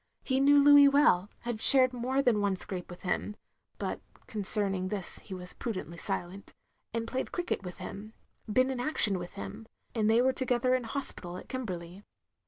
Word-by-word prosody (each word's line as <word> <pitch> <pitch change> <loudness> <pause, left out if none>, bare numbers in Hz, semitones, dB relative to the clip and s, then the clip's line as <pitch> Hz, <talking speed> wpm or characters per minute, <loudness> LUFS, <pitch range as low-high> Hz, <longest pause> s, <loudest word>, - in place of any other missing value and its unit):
He 260 -1 -1
knew 285 +1 +5
Louis 285 0 +7
well 280 - +3
— - - -36
had 235 -2 -5
shared 255 -2 +7
more 255 +3 -2
than 225 -5 +1
one 200 -1 0
scrape 185 -1 -8
with 175 - -12
him 205 +3 -3 0.4
(but - - -5 0.2
concerning 200 -3 +4
this 195 -2 -1
he 190 - -9
was 180 0 -8
prudently 185 -7 -6
silent) 180 +4 -6 0.2
— - - -49
^and 230 0 -2
played 260 +3 -5
cricket 350 - -3
with 180 -2 -9
him 215 +2 -9 0.2
— - - -13
^been 255 +4 +2
in 260 - -5
action 245 -8 +1
with 175 0 -9
him 100 - -9
— - - -43
^and 220 -3 0
they 225 +2 +3
were 260 +1 +2
to 260 - -4
gether 250 0 0
in 255 -2 -1
hospital 195 -9 +1
at - - -12
Kimberley. 185 -7 -7
220 Hz, 200 wpm, -29 LUFS, 185-255 Hz, 0.4 s, Louis